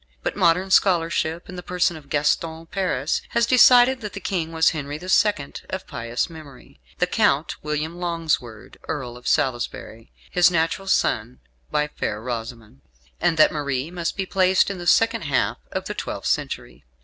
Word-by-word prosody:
But - - -2
modern 185 0 +2
scholarship, 170 -3 +2
in 180 - -9
the - - -5
person 180 -1 0
of 145 -3 -13
Gaston 160 +2 0
Paris, 165 -6 -1 0.2
has 235 - +4
decided 250 +1 +6
that 210 -2 -6
the 200 - -5
King 175 -4 -2
was 160 0 +3
Henry 145 -1 -5
the 180 +4 -9
Second, 190 -8 +1
of 190 0 -5
pious 115 +1 -3
memory; 155 -6 -14 0.2
the - - +2
Count, - - +1
William 150 +2 -3
Longsword, 165 -10 -3
Earl 125 -4 -4
of 125 - -10
Salisbury, 120 -4 -2 0.2
his 180 0 +5
natural 170 +3 -1
son 120 - 0 0.3
by 150 0 0
Fair 105 -7 -4
Rosamund; 115 - -7 0.4
and 165 - +2
that 155 - +6
Marie 140 0 -2
must 175 0 -3
be 195 - -1
placed 185 +1 +3
in 190 - -6
the 175 - -6
second 225 +2 +3
half 140 -2 0
of - - -3
the - - -4
twelfth - - -5
century. - - -3
165 Hz, 170 wpm, -23 LUFS, 140-185 Hz, 0.4 s, decided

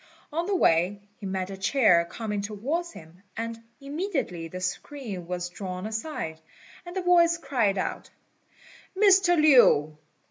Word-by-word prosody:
On 335 +3 -1
the 400 - 0
way, 180 - +2 0.2
he 200 - -6
met 190 0 -3
a 195 - -7
chair 195 -5 +4
coming 210 +3 -4
towards 265 - -3
him, 160 +3 -14 0.2
and 230 0 -4 0.2
immediately 280 - -3
the 185 +3 -7
screen 190 0 -5
was 180 0 -3
drawn 185 +1 -6
aside, 220 - -5 0.5
and 350 +2 -6
a 375 - -1
voice 340 -1 +4
cried 245 -10 0
out, 185 - -3 0.9
"Mr. 385 -4 +5
Lin! 195 - +5
220 Hz, 140 wpm, -26 LUFS, -, 0.9 s, Mr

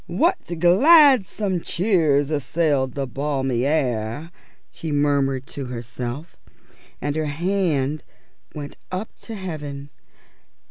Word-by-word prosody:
"What 340 - 0
gladsome 210 - +5
cheers 160 -8 +1
assailed 145 -3 0
the 140 -1 -1
balmy 135 -2 -1
air!" 135 0 -1 0.4
she 160 - -6
murmured 140 -2 +1
to 140 - -5
herself, 125 +5 -6 0.6
and 145 0 -2
her 155 0 0
hand 155 -3 0 0.5
when 145 -1 -7 0.2
up 185 +4 -5
to 225 - -8
heaven. 145 -7 -6
150 Hz, 100 wpm, -22 LUFS, 135-175 Hz, 0.6 s, gladsome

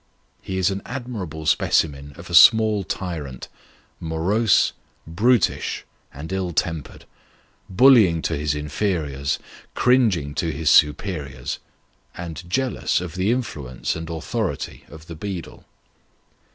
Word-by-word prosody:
He 95 - -5
is 95 0 +2
an 95 0 -4
admirable 110 - -6
specimen 70 -2 +1
of - - -10
a - - -8
small 110 -2 +6
tyrant: 80 -9 -5 0.5
morose, 90 +7 +2 0.3
brutish, 105 +7 +1 0.3
and 80 +7 -8
ill 95 -2 -2
tempered; 80 0 -3 0.6
bullying 95 -6 +5
to 80 - -1
his 75 0 -1
inferiors, 75 -3 -2 0.4
cringing 110 - +2
to 80 +2 -1
his 75 +1 +1
superiors, 75 -2 +1 0.6
and 85 0 -7
jealous 130 +6 0
of 90 -2 -6
the 95 +3 0
influence 75 - -2
and 80 0 -6
authority 90 +5 -4
of 80 0 -12
the 85 - -9
beadle. 90 0 -7
85 Hz, 115 wpm, -22 LUFS, 75-100 Hz, 0.6 s, small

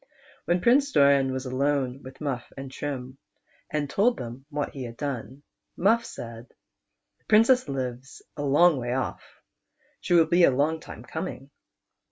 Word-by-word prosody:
When 175 +1 +1
Prince 275 +6 +4
Doran 140 - +4
was 130 +1 -4
alone 135 0 -1
with 130 +3 -12
Muff 135 -5 -4
and 135 -1 -7
Trim, 135 -2 -5 0.5
and 150 -1 -1
told 220 - +2
them 125 +3 -8
what 145 -1 -3
he 135 -3 -6
had 115 -1 -9
done, 140 -1 -5 0.3
Muff 225 +5 +3
said, 115 +1 -9 0.4
" - - -56
The - - -39
Princess 225 - +4
lives 130 -1 -5
a - - -5
long 145 +3 +5
way 120 -1 -2
off; 130 - -3 0.8
she 175 - +1
will 165 -1 +6
be 175 +2 +3
a - - +8
long 145 +5 +1
time - - -11
coming. 135 +2 -6
140 Hz, 165 wpm, -26 LUFS, 130-160 Hz, 0.8 s, a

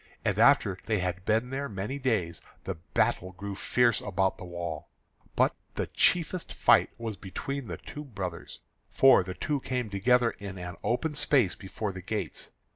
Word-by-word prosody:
And - - +1
after 95 -2 +5
they 110 -2 +2
had 90 0 -2
been 115 +4 +1
there 140 +1 -3
many 105 +7 -4
days, 100 -11 0 0.2
the - - -3
battle 85 +2 -1
grew 100 +3 -6
fierce 120 +4 +2
about 95 -2 0
the - - -7
wall. 85 -3 -5 0.5
But - - +3 0.2
the - - -1
chiefest 175 0 +1
fight - - +5
was 115 -3 -5
between 135 +7 -5
the 85 -3 -5
two 150 - -8
brothers, 95 -9 -6 0.3
for 135 -5 +6
the 90 0 -6
two 145 -1 -1
came 125 -4 -3
together 120 +4 +3
in 100 -2 -8
an 90 0 -6
open 150 +6 0
space 135 -8 +2
before 100 +2 -4
the 95 0 -8
gates. 90 - -4
100 Hz, 170 wpm, -29 LUFS, 95-125 Hz, 0.5 s, for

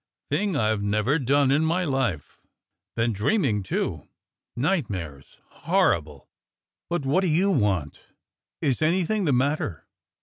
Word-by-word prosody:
Thing 200 -4 0
I've 110 -5 +1
never 105 +9 +1
done 140 +1 +2
in 145 +3 +3
my 175 +3 +1
life. 130 - -2 0.6
Been 115 0 +1
dreaming, 110 - +1
too. 95 - -3 0.5
Nightmares 105 - -3
— - - -40 0.2
horrible! 75 -4 +1 0.6
But 170 -5 -2
what 145 +8 +2
do 190 - 0
you 180 +5 +2
want? 95 - 0 0.6
Is 135 -1 0
anything 185 +5 +1
the 150 - +2
matter? 130 - -1
135 Hz, 130 wpm, -25 LUFS, 105-160 Hz, 0.6 s, in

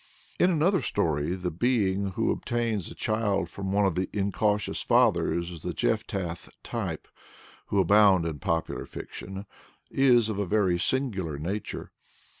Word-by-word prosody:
In 180 - +5
another 180 +3 +2
story, 80 -3 0
the 90 -1 -3
being 100 -1 +1
who - - +1
obtains 115 -6 -2
a - - -10
child 105 -6 0
from 95 -1 -4
one 100 +1 +3
of 95 - +2
the 90 +2 -2
incautious 105 +1 0
fathers 90 -8 +2
of 85 -3 -9
the - - -4
Jephthah 85 +7 -1 0.3
type - - -4 0.6
who 100 - +1
abound 95 -1 +5
in 80 -3 -3
popular 85 -4 -2
fiction, 95 +2 -8 0.5
is 125 -4 +4
of 105 -2 -3
a 100 - 0
very 95 -3 +2
singular 95 - -1
nature. 95 +8 -4
100 Hz, 145 wpm, -27 LUFS, 85-110 Hz, 0.6 s, In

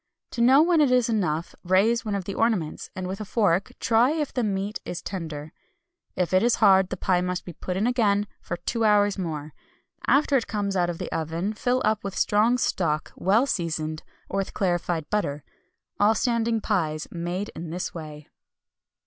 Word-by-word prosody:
To 235 - -3
know 265 +5 +6
when 335 -2 +3
it 290 - +4
is 250 -2 +3
enough, 170 -7 -1
raise 205 +6 +3
one 210 -3 -2
of 195 - -2
the 195 - -5
ornaments, 205 -10 -1
and 185 -1 -4
with 190 +3 -5
a - - -2
fork 200 -3 +1
try 230 +2 +3
if 305 -2 -2
the 250 - 0
meat 200 0 -2
is 175 - -5
tender. 155 -5 -6 0.6
If 180 0 -1
it 185 - +5
is 240 +2 +3
hard 190 -3 +5
the 185 - -4
pie 180 0 +1
must 180 0 -3
be 175 - -8
put 180 +3 -4
in 205 - +1
again 210 -5 +2 0.2
for 175 - -4
two 230 +5 -2
hours 205 -2 +3
more. 155 -4 -4 0.5
After 285 0 +3
it 235 - -2
comes 200 -2 -2
out 175 -1 +2
of 170 - -4
the - - -6
oven 165 +6 -2
fill 245 +4 0
up 215 0 +1
with 200 -1 -5
strong 220 +4 +3
stock, 160 -10 -1
well 210 +8 +3
seasoned, 160 - -2 0.3
or 195 - -3
with 195 - -3
clarified 175 -4 -1
butter. 150 -9 -1 0.6
All 210 +2 +4
standing 230 -1 +1
pies 160 -8 -1
made 175 +4 -3
in 165 0 -6
this 180 +3 -4
way. 155 -3 -9
195 Hz, 190 wpm, -25 LUFS, 175-225 Hz, 0.6 s, know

